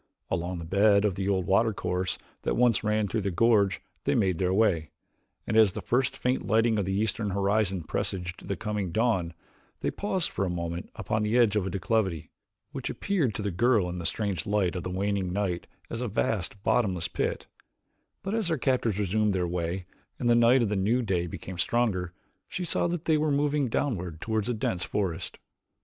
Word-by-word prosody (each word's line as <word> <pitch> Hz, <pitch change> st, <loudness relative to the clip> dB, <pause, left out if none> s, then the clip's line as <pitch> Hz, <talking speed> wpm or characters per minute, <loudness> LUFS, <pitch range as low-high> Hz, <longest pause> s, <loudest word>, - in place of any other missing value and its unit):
Along 90 Hz, +2 st, -1 dB
the 85 Hz, -, -6 dB
bed 100 Hz, +3 st, +4 dB
of 100 Hz, -, +2 dB
the 95 Hz, +1 st, -2 dB
old 95 Hz, -2 st, +1 dB
watercourse 95 Hz, -3 st, +1 dB, 0.2 s
that -, -, -1 dB
once 120 Hz, -4 st, +3 dB
ran 105 Hz, -1 st, +1 dB
through 110 Hz, +3 st, -1 dB
the 100 Hz, -, -1 dB
gorge 100 Hz, 0 st, +3 dB, 0.3 s
they -, -, +2 dB
made 95 Hz, -4 st, +1 dB
their 90 Hz, -1 st, +1 dB
way, 95 Hz, -7 st, +2 dB, 0.6 s
and -, -, -2 dB
as 110 Hz, -4 st, +6 dB
the -, -, -4 dB
first 125 Hz, +1 st, +1 dB
faint 125 Hz, +1 st, -1 dB
lightening 110 Hz, 0 st, +3 dB
of 100 Hz, -, 0 dB
the 95 Hz, +1 st, -1 dB
eastern 110 Hz, -1 st, 0 dB
horizon 100 Hz, -1 st, +1 dB
presaged 90 Hz, +3 st, -3 dB
the 100 Hz, -, -1 dB
coming 105 Hz, -4 st, -3 dB
dawn, 95 Hz, -6 st, +1 dB, 0.5 s
they -, -, 0 dB
paused 190 Hz, -4 st, -1 dB
for -, -, -1 dB
a 95 Hz, -, 0 dB
moment 85 Hz, +1 st, -4 dB
upon 110 Hz, +1 st, -1 dB
the 105 Hz, +3 st, +1 dB
edge 115 Hz, -4 st, +4 dB
of 100 Hz, -3 st, +1 dB
a -, -, -1 dB
declivity, 95 Hz, -3 st, -1 dB, 0.4 s
which -, -, -4 dB
appeared 160 Hz, -, 0 dB
to 105 Hz, -, -3 dB
the 100 Hz, -, -1 dB
girl 110 Hz, 0 st, +3 dB
in 90 Hz, 0 st, -4 dB
the 85 Hz, -, -5 dB
strange 100 Hz, -4 st, -2 dB
light 100 Hz, -3 st, +1 dB
of 90 Hz, -, -2 dB
the 90 Hz, -, -4 dB
waning 95 Hz, 0 st, -1 dB
night 90 Hz, -3 st, -2 dB, 0.2 s
as 115 Hz, -, -5 dB
a 125 Hz, -, -1 dB
vast, 100 Hz, -1 st, -1 dB
bottomless 95 Hz, -8 st, +1 dB
pit; -, -, -2 dB, 0.8 s
but, 195 Hz, -, -3 dB
as 220 Hz, -4 st, 0 dB
their 165 Hz, -2 st, +1 dB
captors 125 Hz, -6 st, +1 dB
resumed 105 Hz, +1 st, +1 dB
their 90 Hz, -1 st, 0 dB
way 90 Hz, +1 st, -2 dB, 0.3 s
and 120 Hz, -, -2 dB
the 120 Hz, -, +6 dB
light 120 Hz, +2 st, +5 dB
of 110 Hz, -, 0 dB
the 105 Hz, -, 0 dB
new 110 Hz, +6 st, +2 dB
day 90 Hz, -5 st, 0 dB
became 90 Hz, +1 st, -7 dB
stronger, 100 Hz, -8 st, +1 dB, 0.4 s
she 180 Hz, -, -4 dB
saw 175 Hz, -, 0 dB
that 175 Hz, -1 st, -3 dB
they 155 Hz, -2 st, +3 dB
were 155 Hz, 0 st, +1 dB
moving 145 Hz, -1 st, +1 dB
downward 90 Hz, -, -2 dB
toward 110 Hz, +2 st, -1 dB
a -, -, +1 dB
dense 95 Hz, -5 st, -1 dB
forest. 90 Hz, -2 st, -2 dB
100 Hz, 200 wpm, -28 LUFS, 90-115 Hz, 0.8 s, as